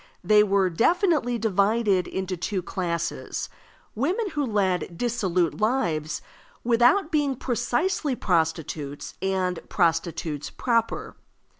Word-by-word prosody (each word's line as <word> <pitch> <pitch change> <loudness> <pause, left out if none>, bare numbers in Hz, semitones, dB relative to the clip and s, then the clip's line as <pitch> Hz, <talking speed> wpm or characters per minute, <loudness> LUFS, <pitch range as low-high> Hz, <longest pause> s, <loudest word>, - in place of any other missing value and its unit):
They 210 +3 +6
were 195 -3 +2
definitely 295 - +2
divided 205 -2 +2
into 190 -1 -3
two 185 +2 -3
classes: 170 -2 -3 0.4
women 365 - -1
who 295 -1 -1
led 190 -7 0
dissolute 185 -8 0
lives 175 - 0 0.4
without 245 +10 +3
being 290 -4 +1
precisely 260 - -1
prostitutes, 160 -6 -1
and 185 -2 0
prostitutes 165 -4 0
proper. 230 -2 -1
205 Hz, 100 wpm, -25 LUFS, 175-245 Hz, 0.4 s, They